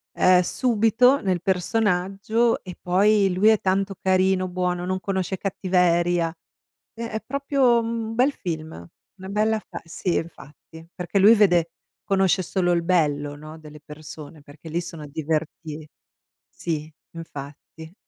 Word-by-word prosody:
ehm, 185 0 +5
subito 235 +5 +2
nel 185 -3 -1
personaggio 200 +3 0
e 180 -2 -10
poi 195 +2 +3
lui 190 +4 +3
è 220 - +3
tanto 195 +1 0
carino, 185 0 +2
buono, 180 -1 -2
non 185 +1 -2
conosce 190 0 -2
cattiveria. 175 -3 +1 0.6
Ehm, 230 0 -5
è 220 -1 -4
proprio 275 -2 +2
un 230 -1 -4
bel 255 +4 +3
film, 160 - -5 0.5
una 190 +1 -9
bella 215 +2 +1
fa - - -9
sì, 170 +1 -3
infatti. 160 0 -7
Perché 180 +2 -2
lui 210 +4 +7
vede 175 -6 +3 0.3
conosce 190 -2 +2
solo 180 0 -1
il 170 -1 +1
bello, 145 -5 +1
no, 155 +2 -11
delle 150 -1 -13
persone 150 0 -11
perché 145 +3 -13
lì 165 +2 -1
sono 165 -3 -8
diverti 155 +1 -4 0.6
sì, 155 -2 -5 0.2
infatti. 160 +1 -10
180 Hz, 135 wpm, -23 LUFS, 160-205 Hz, 0.6 s, lui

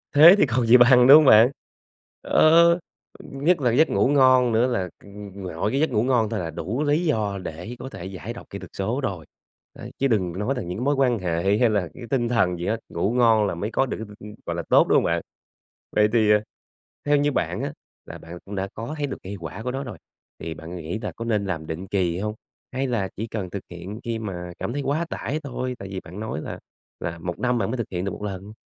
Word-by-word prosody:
Thế 165 +6 +10
thì 200 - +5
còn 125 -2 0
gì 120 +2 +8
bằng, 125 0 +6
đúng 140 - +11
hông 155 - +5
bạn? 115 +1 +7 0.7
Ờ, 170 +2 +5 0.4
nhất 150 +4 0
là 125 - +3
cái 115 - +1
giấc 160 - +5
ngủ 100 +4 +2
ngon 130 -3 +5
nữa 115 +3 +3
là 95 -8 -1
c - - -20 0.3
nội 95 0 -3
cái 135 - 0
giấc 160 - +2
ngủ 110 -3 +1
ngon 120 -4 +2
thôi 110 - -2
là 85 -2 -3
đủ 120 - -3
lý 150 +4 +1
do 105 -9 0
để 90 +9 -7
có 130 - -7
thể 90 - -9
giải 95 +4 -6
độc 120 - -12
kỹ 100 - -7
thuật 95 -2 -10
số 115 +8 -1
rồi, 95 - -4 0.5
đấy, - - -10
chứ 135 - +2
đừng 95 -8 0
nói 110 +6 0
là - - -2
những 90 +2 -5
cái 120 - -3
mối 145 +2 +2
quan 125 -4 +2
hệ 90 +3 0
hay 120 - +4
là 100 -5 0
cái 130 - -11
tinh 120 -4 0
thần 95 -7 +1
gì 85 - -4
hết, 110 - 0
ngủ 90 +5 -1
ngon 115 -4 +4
là - - -3
mới 100 +6 -4
có 135 - +2
được 130 - -4
cái 110 - -6
t 105 - -14
ưm, 105 0 -10
gọi - - -3
là, - - -3
tốt, - - +5
đúng - - +3
hông - - +4
bạn? - - 0 0.7
Vậy 105 0 +5
thì, 110 -3 +4
ờ, 105 0 +4 0.6
theo 145 0 +3
như 145 +1 +1
bạn - - -2
á - - -4 0.3
là - - -9
bạn 85 +1 -10
cũng 100 - -7
đã 95 0 -2
có 115 +8 -5
thấy 145 -1 -1
được 135 - -5
cây 100 +2 -6
quả 85 +6 -7
của 125 - -2
nó 135 +2 -4
rồi, 120 -5 -8 0.4
thì 80 0 -5
bạn 80 +2 -9
nghĩ 85 +3 -5
là 105 - -4
có 115 - -6
nên 105 -3 0
làm 80 -5 -4
định 80 +5 -5
kỳ 90 -3 0
hông 105 +1 -3 0.4
hay 135 +1 -1
là 110 -6 -1
chỉ 110 +3 -4
cần 105 -5 -5
thực 100 +1 -6
hiện 90 +5 -8
khi 115 -2 -3
mà 90 -5 -6
cảm 120 - -3
thấy 145 - -2
quá 145 +5 -1
tải 150 +3 -3
thôi? 130 -2 -4
Tại 100 - -8
vì 95 - -4
bạn 90 +2 -11
nói 110 -7 -4
là - - -7 0.4
là 85 0 -4
1 85 +1 -5
năm 125 -1 +1
bạn 115 - -1
mới 130 - -2
thực 115 - -4
hiện 90 0 -3
được 100 - -2
1 - - -8
lần. 100 0 -6
110 Hz, 265 wpm, -24 LUFS, 95-130 Hz, 0.7 s, đúng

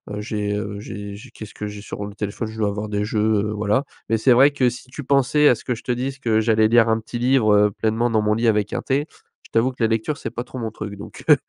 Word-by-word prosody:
heu, 105 - -4
j'ai 105 -1 -2
heu 100 0 -4
j'ai 100 -1 -7
j'ai 115 +4 -12
qu'est-ce 110 -3 -10
que 105 - -5
j'ai 105 0 -8
sur 105 -1 -6
le 100 - -8
téléphone? 105 +2 -4
Je 110 0 -9
dois 105 -1 +2
avoir 105 +1 -4
des 105 0 -1
jeux, 110 0 -1 0.3
heu, - - -3
voilà. 105 +5 +1 0.3
Mais 115 - +3
c'est 125 +3 +4
vrai 135 +4 +6
que 130 -3 +2
si 120 - -8
tu 145 - -7
pensais 140 +2 +3
à 125 - +5
ce - - -13
que 125 - 0
je - - -11
te 125 - -2
dise, 135 +2 -3
que 110 -3 +2
j'allais 110 -1 +3
lire 115 -1 +5
un 110 0 +2
petit 115 +2 -7
livre, 125 -4 +3
heu, 105 0 +4
pleinement 110 +3 0
dans 110 -1 +3
mon 105 0 +2
lit 115 +1 +1
avec 105 -2 +2
un - - -1
thé, 140 +3 0 0.4
je - - -18
t'avoue 115 +3 +2
que 125 -2 -4
la - - +5
lecture 115 +7 -1
c'est 115 - -5
pas 120 - -4
trop 130 0 -8
mon 110 -2 -3
truc 105 -2 -7
donc, - - -10
heu. - - +10
110 Hz, 300 wpm, -22 LUFS, 105-125 Hz, 0.4 s, heu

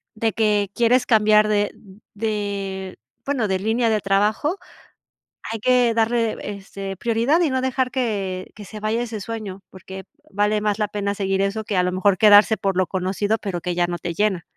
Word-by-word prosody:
de 225 0 0
que 210 -1 +1
quieres 245 +2 +3
cambiar 215 -2 +4
de 205 -1 +1 0.4
de, 200 -3 -3 0.3
bueno, 265 -6 0
de 190 - +1
línea 225 +3 +1
de 215 -1 +2
trabajo, 210 - +1 0.9
hay 225 -1 -4
que 250 -1 +3
darle, 230 0 +1
este, 195 -1 -7
prioridad 235 +8 +1
y 335 - +3
no 260 0 -1
dejar 260 0 0
que 200 -7 -2
que 210 -2 -11
se 215 +1 -9
vaya 215 +2 -1
ese 225 -3 -5
sueño 205 -4 -6
porque 190 +1 -10 0.3
vale 210 +1 +1
más 210 0 -1
la 210 - 0
pena 200 -1 -2
seguir 195 -1 -1
eso 205 +2 -2
que 200 -3 -1
a - - +4
lo 180 0 -1
mejor 185 0 +2
quedarse 210 +1 +6
por 195 -2 -1
lo 185 -1 +2
conocido 195 +4 -1
pero 190 -5 -4
que 180 0 -2
ya 175 0 +1
no 175 - -2
te 170 +1 -4
llena. 195 -2 0
210 Hz, 190 wpm, -22 LUFS, 195-225 Hz, 0.9 s, quedarse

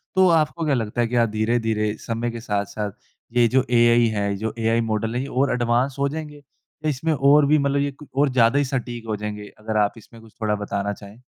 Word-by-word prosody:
तो 190 0 +5
आपको 160 -1 +1
क्या 150 - +2
लगता 115 0 -2
है 120 - +1
कि 120 - -3
आप 115 -1 +3
धीरे-धीरे 110 -1 0
समय 115 +1 -3
के 115 - -6
साथ 105 -3 -1
साथ 105 0 -4 0.4
ये 120 -1 +5
जो 130 +2 +2
एआई 120 0 +5
है 100 -1 -1
जो 110 +2 -3
एआई 115 +1 +2
मॉडल 110 0 -2
है 125 - 0
ये 135 - -4
और 135 0 +1
एडवांस 125 +2 +1
हो 140 0 +1
जाएँगे? 150 -1 -7 0.4
इसमें 155 +2 0
और 145 +1 +5
भी 150 +2 +4
मतलब 140 -1 +1
ये 140 0 -1 0.3
और 145 0 +4
ज़्यादा 125 0 +3
ही 145 - +1
सटीक 120 -3 -4
हो 110 - -1
जाएँगे 105 0 -6
अगर 110 0 -3
आप 105 -1 +2
इसमें 115 +1 -15
कुछ 110 -2 -17
थोड़ा 105 -1 +1
बताना 100 0 -3
चाहें। 105 +4 -14
120 Hz, 225 wpm, -23 LUFS, 110-140 Hz, 0.4 s, तो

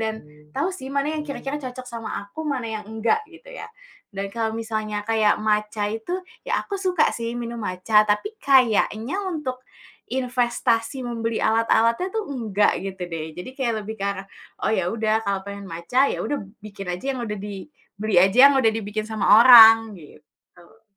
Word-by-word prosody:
dan 220 0 -3 0.3
tahu 370 - 0
sih 265 -8 -8
mana 280 +2 -1
ya - - -2
kira-kira 280 0 -5
cocok 255 -1 -8
sama 230 -2 -5
aku, 200 +10 -10
mana 275 -5 -2
yang 220 -1 -5
enggak, 220 - 0
gitu - - -15
ya, - - -8 0.5
dan 195 0 -4
kalau 225 0 -2
misalnya 215 -2 -3
kayak 220 -2 +2
Matcha 210 -1 0
itu, 225 +10 -5 0.3
ya - - 0
aku 400 -1 -5
suka 370 -3 +2
sih 230 0 -4
minum 235 0 -5
Matcha 205 +2 +2
tapi 210 - 0
kayaknya 255 - +2
untuk, 270 -7 -4 0.5
investasi 245 -1 0
membeli 230 -1 -3
alat-alatnya 230 +7 +2
tuh 440 -1 -3
enggak, 210 -5 +1
gitu 190 -1 -6
deh. 160 -2 -6
Jadi 180 +8 -7
kayak 235 -5 -1
lebih 220 +2 -6
ke - - -2
arah, 200 -1 -3 0.4
"Oh - - +2
ya 185 -5 0
udah 220 -1 0
kalau 200 -1 -1
pengen 200 0 -7
Matcha, 170 +12 +1
ya - - -3
udah" 290 - -2
b 200 - -10 0.2
"bikin 200 -2 -9
aja 265 +10 -3
yang 245 - -5
udah" 210 -2 -4
di 195 -3 -7 0.3
"beli 215 0 -1
aja 230 +9 +7
yang - - +1
udah 225 -3 +4
dibikin 215 -1 -4
sama 215 -1 +4
orang," 225 -2 +9
gitu. 170 +5 -19
225 Hz, 180 wpm, -23 LUFS, 210-255 Hz, 0.5 s, orang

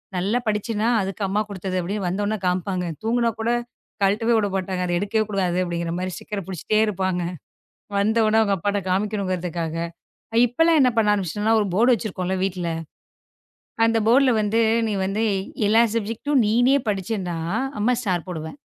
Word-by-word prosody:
நல்லா 200 +7 +1
படிச்சேனா! 215 +1 0
அதுக்கு 195 +2 -4
அம்மா 200 +2 0
குடுத்தது." 190 -1 -4
அப்படின்னு 195 +3 -3
வந்தவுன்னே 205 +4 -1
காமிப்பாங்க. 180 0 -1 0.2
தூங்குனா 230 +1 +1
கூடக் 240 +2 0 0.4
கலட்டவே 220 +4 +2
விடமாட்டாங்க. 190 -3 -1
அத 175 - -1
எடுக்கவே 210 +3 0
கூடாது 185 -3 0
அப்படிங்குற 170 -1 -3
மாதிரி 185 0 -3
ஸ்டிக்கர 205 -1 -5
புடிச்சிட்டே 190 +3 -1
இருப்பாங்க. 185 -3 -1 0.8
வந்ததோன 220 +1 +3
அவுங்க 200 -2 +2
அப்பாட்ட 205 +3 -1
காமிக்கணும்ங்குறதுக்காக. 185 -4 -1 0.6
அ - - +1
இப்பெல்லாம் 325 +6 +3
என்னா 255 -1 +4
பண்ண 210 -2 +4
ஆரம்பிச்சுட்டேன்னா 210 +3 +1
ஒரு 205 - -1
போர்டு 240 +5 +5
வச்சிருக்கோம்ல 190 -3 -3
வீட்ல! 180 -3 -2 1.2
அந்த 230 0 +2
போர்ட்ல 260 +3 +5
வந்து 215 +2 +1 0.3
நீ 210 - -1
வந்து 205 +4 -1 0.4
எல்லா 225 +2 +5
சப்ஜக்டும் 230 +5 0
நீனே 245 +6 +4
படிச்சேன்னா 190 -3 -3 0.4
அம்மா 230 +4 +3
ஸ்டார் 185 -6 -1
போடுவேன். 160 - -6
205 Hz, 145 wpm, -23 LUFS, 185-225 Hz, 1.2 s, போர்டு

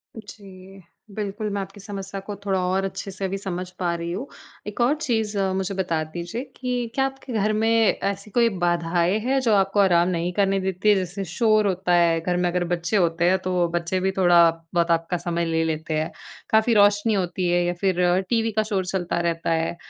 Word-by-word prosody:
जी, 195 -3 -12 0.3
बिल्कुल 210 0 -3
मैं 200 - -1
आपकी 195 +2 -9
समस्या 195 -1 -6
को 205 +1 -7
थोड़ा 190 -1 +1
और 190 +1 0
अच्छे 195 +1 -5
से 195 +1 -5
अभी 195 +1 -2
समझ 185 -2 -5
पा 175 -2 0
रही 170 0 -4
हूँ। 215 +10 -4 0.4
एक 210 +3 -4
और 250 +5 +4
चीज़, 220 -6 -1 0.2
मुझे 190 +1 -2
बता 170 -4 -1
दीजिए 175 +9 -6
कि, 245 -2 -3
क्या 270 0 +2
आपके 270 -1 -6
घर 215 0 +1
में 220 +1 +1 0.3
ऐसी 200 +1 -3
कोई 235 -1 +3
बाधाएँ 175 +2 +1
हैं, 260 +5 +1
जो 235 -4 +2
आपको 195 +1 +2
आराम 175 -3 +4
नहीं 175 0 -1
करने 195 0 +1
देती 190 +2 0
है? 210 - +6
जैसे 190 +1 -3
शोर 215 +3 +2
होता 185 -1 0
है, 170 -1 +4
घर 180 +1 -1
में 180 0 +1
अगर 180 0 0
बच्चे 175 +5 0
होते 170 -2 +1
हैं, 190 - +3
तो 180 -2 0
बच्चे 175 +2 -1
भी 190 +1 0
थोड़ा 175 -2 +6 0.2
बहुत 170 0 +2
आपका 165 +2 0
समय 170 0 -2
ले 165 0 0
लेते 160 0 -3
हैं। 155 - -3 0.4
काफ़ी 220 +2 +3
रोशनी 205 +1 +4
होती 180 -2 -1
है 175 0 +2
या 175 - 0
फिर, 180 -1 +2
टीवी 225 -1 +1
का 215 0 +1
शोर 200 -4 -2
चलता 175 -2 -2
रहता 170 -1 -1
है, 165 +1 0
190 Hz, 210 wpm, -23 LUFS, 175-210 Hz, 0.4 s, है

